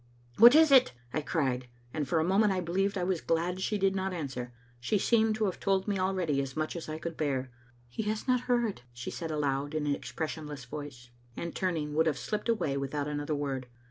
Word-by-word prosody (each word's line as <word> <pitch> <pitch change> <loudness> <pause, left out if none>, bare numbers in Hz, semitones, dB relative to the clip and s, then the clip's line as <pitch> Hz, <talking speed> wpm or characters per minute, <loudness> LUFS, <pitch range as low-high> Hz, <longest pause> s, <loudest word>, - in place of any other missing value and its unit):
"What 240 +5 +10
is 315 -1 +7
it?" 260 - +6 0.2
I 155 - 0
cried, 130 -5 -1 0.3
and 150 -3 -2
for 160 - +2
a - - +2
moment 195 +4 +3
I 190 - 0
believe 195 +3 0
I 180 - -1
was 180 -2 0
glad 175 +3 0
she 210 +2 0
did 195 -1 +2
not 190 0 -1
answer. 130 -6 -4 0.3
She 125 - +1
seemed 220 +1 +3
to 220 0 0
have 190 - -2
told 195 0 +1
me 200 -2 0
already 185 -7 +1
as 135 +1 -6
much 155 +2 -1
as 165 -2 -6
I 155 - -3
could 165 +1 -5
bear. 135 -4 -1 0.2
" 120 0 -31
He 120 - -4
has 215 +3 -3
not 250 -1 +4
heard, 235 - +1
" - - -31
she 120 +1 -6
said 165 -2 -5
aloud 145 -1 -1
in 155 -1 0
an 145 - +2
expression 155 +1 -4
less 145 -3 -7
voice, 125 -3 -8 0.3
and, 170 -1 -4
turning, 160 -6 -1
would 160 +2 +3
have 150 -3 +1
slipped 210 +2 -3
away 150 -12 +1
with 140 +1 -3
out 145 -1 -1
another 150 +1 -2
word. 135 -3 -3
160 Hz, 235 wpm, -30 LUFS, 140-195 Hz, 0.3 s, What